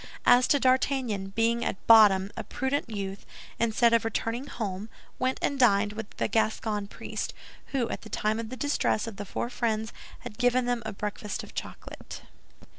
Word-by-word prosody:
As 245 +1 +6
to 285 - +4
D'Artagnan, 255 -6 +1
being 230 +3 +1
at - - -3
bottom 205 -4 +7
a - - -4
prudent 265 0 -2
youth, 200 -2 -5 0.4
instead 230 +1 +3
of 230 - +4
returning 230 +4 -2
home, 205 -1 -4 0.3
went 255 +1 0
and 280 - 0
dined 205 -4 +4
with 220 -1 -6
the - - 0
Gascon 215 -1 0
priest, - - -5 0.3
who, 255 -4 -1
at - - -4
the 220 - -11
time 215 +1 0
of 225 -1 -5
the 255 - -7
distress 285 -6 0
of 225 -4 -7
the 205 - -5
four 235 +5 -4
friends, 220 -3 -1 0.3
had 210 - -9
given 245 0 +3
them 245 -1 0
a - - -3
breakfast 210 0 -4
of - - -12
chocolate. - - -8
225 Hz, 180 wpm, -28 LUFS, 210-245 Hz, 0.4 s, bottom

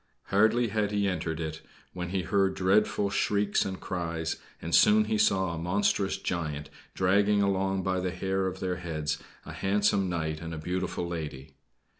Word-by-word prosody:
Hardly 110 +4 +3
had 105 -1 0
he 100 -1 +1
entered 80 -3 -2
it 80 -1 -4 0.3
when 90 -1 -4
he 95 0 -1
heard 95 +2 +1
dreadful 100 +1 +2
shrieks 100 0 +1
and 95 -1 -4
cries, 85 -3 -3 0.2
and 85 +1 -5
soon 215 0 +6
he 220 0 0
saw 95 - +2
a 85 - -4
monstrous 95 +2 +1
giant 75 -6 -3 0.2
dragging 100 +2 +3
along 95 -1 0
by 95 0 0
the 90 0 -1
hair 95 +1 -1
of 95 0 -5
their 90 -1 -1
heads 80 -3 -3 0.3
a - - -8
handsome 100 -1 +1
knight 80 -2 -2
and 80 -1 -5
a - - -6
beautiful 90 +2 -2
lady. 75 -6 -6
95 Hz, 170 wpm, -28 LUFS, 85-100 Hz, 0.3 s, soon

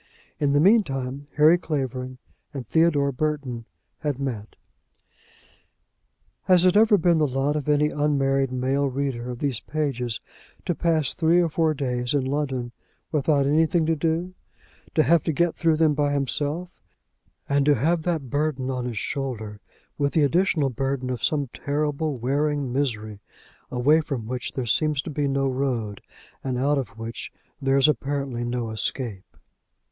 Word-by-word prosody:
In 145 -2 +2
the 145 - +4
meantime, 140 - +2
Harry 155 +4 +6
Clavering 130 -5 -3 0.4
and 130 -3 -4
Theodore 150 -1 +3
Burton 135 -4 -3 0.3
had 145 -4 -2
met. 120 -6 -5 1.9
Has 185 -1 +5
it 185 - +4
ever 215 0 +6
been 170 -2 +3
the 150 - +3
lot 135 +3 0
of 150 0 -2
any 150 0 +3
unmarried 135 -3 +1
male 135 +2 0
reader 130 -2 -3
of 125 - -5
these 130 -4 -1
pages 130 -7 -2 0.5
to 175 - +1
pass 160 -4 +1
three 170 0 +3
or 170 -2 +2
four 160 0 +1
days 125 -1 -1
in 135 -2 +1
London, 135 -3 -2 0.4
without 145 -2 +2
anything 160 +3 +3
to 165 +1 +2
do, 165 +4 -1 0.6
to 155 - +5
have 170 0 +4
to 160 - -1
get 170 +2 +1
through 165 -2 +2
them 155 -1 +3
by 145 0 +1
himself, 145 +5 -2 0.7
and 140 0 +2
to 145 - +6
have 160 +7 +1
that 155 -7 -2
burden 145 -3 -1
on 125 -1 -3
his 120 -3 -4
shoulder, 110 -3 -4 0.4
with 140 -1 +1
the 155 - +3
additional 155 -2 +2
burden 130 +1 -2
of 125 -3 -4
some 145 -3 +1
terrible, 150 0 -1
wearing 140 +1 0
misery, 110 -7 -2 0.5
away 145 +6 +3
from 135 -7 -4
which 125 +2 -4
there 130 - -3
seems 150 +6 +1
to - - -6
be 145 -1 -1
no 135 0 +1
road, 125 -6 -2 0.4
and 130 -2 -2
out 140 +3 +2
of 115 -4 -6
which 115 +1 -6 0.3
there 135 0 +2
is 135 - +5
apparently 140 -4 -1
no 120 -1 -2
escape? 110 -2 -4
140 Hz, 160 wpm, -24 LUFS, 130-155 Hz, 1.9 s, Harry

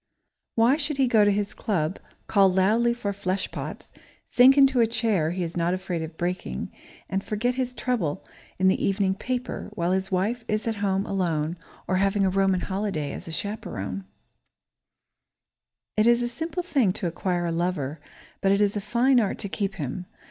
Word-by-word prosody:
Why 235 +5 +4
should 300 -2 -2
he 270 -2 +3
go 220 -3 +5
to 205 - +4
his 205 0 -1
club, 175 -4 -1 0.3
call 195 -2 +4
loudly 215 +6 +3
for 235 -4 -3
flesh 195 -1 -2
pots, - - -7 0.4
sink 260 +3 +7
into 270 -2 +5
a 230 - +4
chair 220 -8 +1
he 180 +1 -2
is 165 0 -5
not 175 +1 +1
afraid 180 -3 -3
of 160 0 -7
breaking, 175 - -3 0.4
and 195 +1 -2
forget 230 +4 -1
his 250 -1 -3
trouble 220 -15 -1 0.3
in 190 - +3
the 190 - +2
evening 195 -1 +2
paper, 250 +5 -4
while 170 +1 0
his 190 +1 -1
wife 210 +6 0
is 215 +1 -1
at 225 -2 -1
home, 195 -1 0
alone, 170 -4 -1 0.3
or 185 - +1
having 195 +1 +2
a 190 - +2
Roman 190 -1 +2
holiday 190 -7 -2
as - - -7
a - - -5
chaperone? 160 - -4 1.9
It 215 +1 +3
is 240 0 +4
a - - 0
simple 325 +8 -4
thing 260 - +2
to - - -5
acquire 175 +1 -1
a 170 - -1
lover, 165 -4 -2 0.4
but 195 - +3
it 200 - +3
is 205 0 +2
a 205 - -1
fine 245 +5 +3
art 210 -4 0
to 200 - -4
keep 195 0 -2
him. 175 +2 -5
195 Hz, 185 wpm, -26 LUFS, 180-230 Hz, 1.9 s, sink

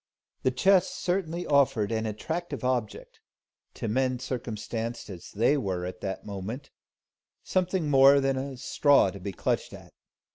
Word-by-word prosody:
The - - +2
chest 185 +9 +3
certainly 175 -1 -2
offered 135 -7 +2
an 110 0 -1
attractive 155 +8 -4
object 125 -5 -2 0.6
to - - -4
men 130 +3 +1
circumstanced 115 -2 -4
as 90 -2 -9
they 120 +8 +2
were 95 -8 -2
at 90 0 -7
that 95 -1 -4
moment, 105 +7 -6 0.7
something 185 -3 0
more 140 0 +7
than 135 0 +1
a 135 0 -4
straw 140 -4 +3
to 100 - -9
be 100 +2 -5
clutched 90 - -2
at. - - -12
130 Hz, 145 wpm, -28 LUFS, 105-145 Hz, 0.7 s, more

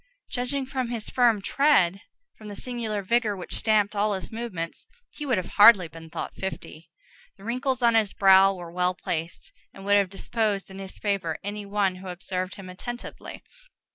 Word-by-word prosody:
Judging 260 +2 -2
from 260 -2 -3
his 230 -2 -5
firm 235 -5 +3
tread, 200 - +3 0.3
from 215 - -12
the 205 - -7
singular 225 -4 -3
vigor 220 0 +1
which 180 - -7
stamped 215 -2 +2
all 205 +1 +1
his 185 -4 -7
movements, 220 - -5 0.2
he 295 - -7
would 250 -5 +2
have 185 - -2 0.2
hardly 205 -5 +9
been 165 0 -12
thought - - -5
fifty. 180 -4 -7 0.5
The 195 - -16
wrinkles 255 +3 -1
on 235 -1 +5
his 220 -3 +3
brow 195 0 +6
were 175 -3 -8
well 180 +1 0
placed, 170 - -5 0.2
and 195 - -11
would 205 0 +5
have 200 -2 +2
disposed 200 0 -2
in 190 - -9
his 190 -1 -7
favor 195 -6 -1
any 205 0 -5
one 200 -2 0
who 190 +1 -10
observed 185 +1 -4
him 195 -2 -10
attentively. 240 +7 -8
200 Hz, 180 wpm, -26 LUFS, 185-235 Hz, 0.5 s, hardly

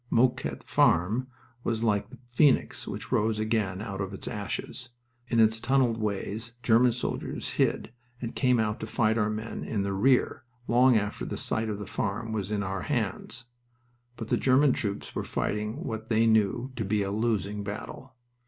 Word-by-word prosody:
Mouquet 125 +2 +1
Farm 105 +10 +3 0.4
was 115 -1 -1
like 105 -3 +1
the - - -12
phoenix 130 +3 +2
which - - -6
rose 110 +1 +2
again 110 -3 -1
out 100 -2 -4
of 95 0 -4
its - - -6
ashes. 105 +4 -4 0.4
In 115 - +1
its 110 0 +5
tunneled 125 -2 +2
ways 110 +2 -3
German 120 +2 +5
soldiers 120 +1 -3
hid - - 0 0.3
and 115 -2 -5
came 125 -3 +3
out 105 -1 0
to 110 - -5
fight 110 0 +1
our 105 -1 +2
men 110 +1 -4
in 100 -3 -1
the 100 0 -1
rear 125 +6 +2 0.2
long 125 0 +5
after 105 -1 -2
the - - -4
site 110 0 -1
of 105 - -2
the 105 - -6
farm 110 +1 -3
was 105 -3 -2
in 105 -1 -1
our 95 0 -3
hands. 120 -2 -2 0.7
But 115 -2 -7
the - - +3
German 135 +1 +4
troops 100 -2 -3
were - - -2
fighting 105 +9 -2
what 110 -6 -5
they 115 0 +3
knew 110 +3 +2
to 110 - -1
be 105 +1 +1
a 100 - -2
losing 105 -2 -1
battle. 110 +5 -7
110 Hz, 180 wpm, -28 LUFS, 105-120 Hz, 0.7 s, its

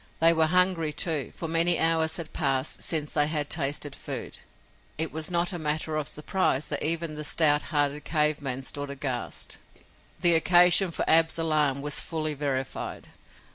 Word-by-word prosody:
They 165 +1 +5
were 160 -1 +2
hungry, 180 -2 +1
too, 155 -4 -1
for 165 - -6
many 165 +1 +3
hours 160 -1 +1
had 165 -3 -8
passed 135 0 -2
since 150 -3 -1
they 145 -1 +3
had 150 -2 -2
tasted 145 -1 -2
food. - - -6 0.6
It 160 0 0
was 155 0 -4
not 175 +1 +1
matter 155 0 -2
of 150 -2 -3
surprise 150 -2 -2
that 145 - -2
even 165 0 0
the 150 0 -7
stout 150 -1 +4
hearted 145 -1 -1
cave 150 -2 0
man 135 -1 -4
stood 145 +1 -4
aghast. 135 -3 -5 0.6
The 175 -2 +4
occasion 175 +3 +6
for 165 - -4
Ab's 165 0 +4
alarm 150 -4 +1
was 145 0 +2
fully 155 -2 -4
verified. 135 -2 -5
155 Hz, 165 wpm, -25 LUFS, 145-165 Hz, 0.6 s, occasion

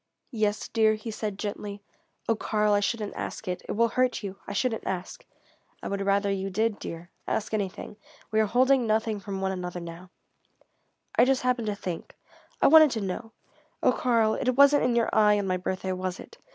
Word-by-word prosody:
"Yes, 215 -3 -1
dear?" 220 -1 +3
he 215 +1 -6
said 210 -2 -4
gently. 205 0 -5 0.4
"Oh, 225 - +3
Karl, 210 -1 +1
I 205 - +4
shouldn't 210 0 -2
ask 220 - -6
it. 180 0 -3
It - - -1
will 230 +2 +2
hurt 255 -2 0
you. 195 -1 -6
I - - -4
shouldn't 225 +2 -1
ask." 185 -1 -4 0.6
"I - - -3
would 200 0 -2
rather 200 0 +1
you 195 0 -2
did, 215 +2 0
dear. 170 +2 -8 0.2
Ask 215 - -2
anything. 205 0 -3 0.3
We 220 - +2
are 215 - +3
holding 255 +2 +3
nothing 220 0 0
from 195 -1 -5
one 190 0 0
another 180 -1 -4
now." 170 +1 -9 1.1
"I - - +8
just 265 0 +2
happened 250 -3 0
to 205 - -1
think 180 -4 -6 0.5
I - - +8
wanted 310 0 +8
to - - -2
know 215 +4 -5 0.5
oh - - +5
Karl, 230 -3 +2
it 255 - -1
wasn't 280 0 +6
in 245 -1 +1
your 235 -1 +1
eye 210 -1 +5
on 200 - -1
my 185 -1 0
birthday, 185 +1 -3
was 185 0 -3
it? 465 - -13
210 Hz, 200 wpm, -27 LUFS, 195-230 Hz, 1.1 s, I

